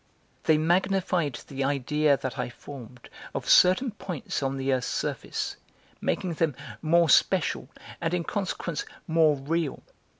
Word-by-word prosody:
They 155 - +5
magnified 175 -2 +1
the 135 -1 -3
idea 140 +1 +2
that 130 -1 -5
I - - -1
formed 125 -1 -11 0.3
of - - -3
certain 205 +8 +6
points 180 -9 -4
on 135 0 -1
the 135 0 0
earth's 125 -1 0
surface, - - -3 0.4
making 180 -2 -1
them 160 -4 0 0.3
more 170 +1 +4
special, 140 - +3 0.3
and 165 - 0
in 180 -1 0
consequence 185 -4 -3 0.2
more 160 -2 +4
real. 150 +2 -2
155 Hz, 135 wpm, -27 LUFS, 135-170 Hz, 0.4 s, certain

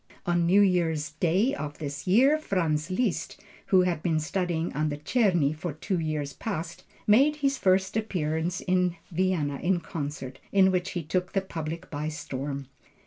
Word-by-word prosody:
On 175 -2 +2
New 195 +4 +6
year's 165 -6 +2
day 180 - +1
of 150 - -5
this 145 0 -6
year, 265 +11 +5
Franz 165 - 0
Liszt, 200 +1 -1 0.3
who 190 -2 +5
had 175 -3 0
been 160 -2 +1
studying 170 0 -1
under 150 0 0
Czerny 165 - +2
for 160 0 -4
two 180 +4 -2
years 155 -3 -2
past, 170 -2 -5 0.2
made 270 +8 +5
his 275 -2 0
first 190 +1 +2
appearance 175 -5 -1
in 180 -1 +1 0.2
Vienna 170 -5 0
in 180 0 +2
concert, 140 -6 -6
in 190 -1 +5
which 180 0 -1
he 175 - -3
took 180 +4 -2
the 195 - +2
public 165 -1 -6
by 150 0 -3
storm. 140 -2 -4
175 Hz, 160 wpm, -27 LUFS, 155-190 Hz, 0.3 s, New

